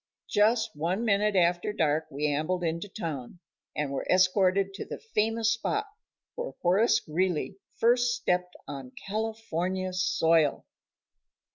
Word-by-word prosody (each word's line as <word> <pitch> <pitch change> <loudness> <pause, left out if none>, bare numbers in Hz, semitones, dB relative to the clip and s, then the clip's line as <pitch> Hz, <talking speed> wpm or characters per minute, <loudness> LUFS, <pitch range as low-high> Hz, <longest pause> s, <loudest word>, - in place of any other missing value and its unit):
Just 220 0 +2
one 175 +9 -1
minute 210 -1 +2
after 175 +2 +2
dark 155 -5 0
we 150 0 -3
ambled 155 +5 0
into 170 +4 -2
town, 165 - -5 0.4
and 150 -2 -2
were 140 - -3
escorted 185 +1 +3
to - - -5
the - - -7
famous 225 - 0
spot 415 - -1 0.5
where - - -5
Horace 195 +7 +4
Greeley 180 +3 -1 0.2
first 245 +1 +3
stepped 180 -5 -1
on 135 -3 -7
California 190 -4 -2
soil. 165 -4 +2
185 Hz, 125 wpm, -28 LUFS, 165-215 Hz, 0.5 s, Horace